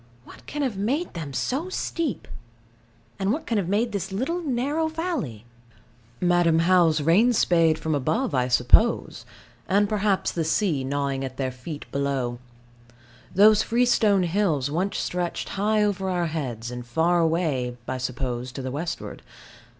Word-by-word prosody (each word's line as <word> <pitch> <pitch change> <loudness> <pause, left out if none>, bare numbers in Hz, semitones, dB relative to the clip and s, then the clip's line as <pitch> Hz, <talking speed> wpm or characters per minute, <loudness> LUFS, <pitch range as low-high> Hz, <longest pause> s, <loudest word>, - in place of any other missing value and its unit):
What - - -15
can 295 -1 -3
have 245 -8 -2
made 265 - -1
them 160 -5 -6
so 270 - -2
steep? 335 -6 -3 0.9
And 195 +1 +1
what 310 +5 -2
can 225 -3 0
have 180 -3 -3
made 220 +4 +1
this 195 -1 -4
little 265 - -2
narrow 290 +2 -1
valley? 315 - -4 0.7
Madam 175 -2 +3
How's 170 -2 +4
rain 195 +11 +4
spade 165 -6 +3
from 160 -1 -2
above, 220 - 0
I 125 -2 +1
suppose, 125 - +3 0.4
and 205 +2 +3
perhaps 205 -2 0
the 165 - -2
sea 160 -3 0
gnawing 140 0 -2
at 130 -1 -6
their 130 -2 -1
feet 145 +4 -8
below. 135 -4 -2 1.0
Those 210 +2 +6
freestone 225 -5 +3
hills 165 -7 0
once 185 +6 -1
stretched 180 -1 -3
high 210 +2 +1
over 195 -2 -1
our 175 -2 0
heads, 125 -8 -4
and 125 0 -6
far 165 +8 +1
away, 155 -7 0
I 130 0 -3
suppose, 125 0 -3
to 135 - -6
the 130 - -4
westward. 160 +5 -5
175 Hz, 150 wpm, -25 LUFS, 140-215 Hz, 1.0 s, Those